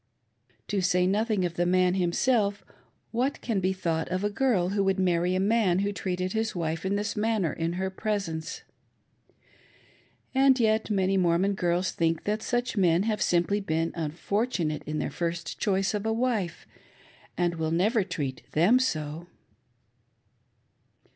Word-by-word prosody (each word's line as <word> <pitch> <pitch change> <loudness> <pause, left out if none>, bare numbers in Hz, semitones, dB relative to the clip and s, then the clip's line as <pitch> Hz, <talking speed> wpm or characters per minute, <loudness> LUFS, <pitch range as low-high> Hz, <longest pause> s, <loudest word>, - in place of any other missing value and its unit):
To 200 -2 0
say 180 0 +2
nothing 205 0 +1
of 175 - -2
the 175 - +2
man 180 0 +3
himself, 200 +3 +1 0.5
what 250 +4 -1
can 225 -5 -1
be 185 0 +1
thought 165 -4 -2
of 185 +2 -2
a 205 - 0
girl 215 -7 +1
who 200 0 +1
would 195 0 +1
marry 180 0 +2
a - - +1
man 200 -3 +2
who 200 +1 0
treated 185 0 -3
his 220 -1 -1
wife 165 -1 -2
in 200 - 0
this 205 +1 -2
manner 210 -5 0
in 165 +1 -2
her 190 +1 -2
presence? 190 -6 -3 1.7
And 265 -1 +4
yet 220 -1 +2
many 195 -2 +1
Mormon 180 +2 +2
girls 175 -1 0
think 165 -1 0
that 210 +1 -1
such 245 0 -1
men 180 -3 +3
have 215 -2 -1
simply 175 +4 +2
been 165 -4 -1
unfortunate 165 - -2
in 155 0 -2
their - - -2
first 170 0 -4
choice 195 -2 +1
of 210 +1 -2
a - - +1
wife, 225 -7 -1 0.7
and 175 -1 0
will 160 -1 -1
never 200 +7 +2
treat 145 -8 -4
them 190 +11 +5
so. 160 - -2
190 Hz, 155 wpm, -27 LUFS, 170-210 Hz, 1.7 s, them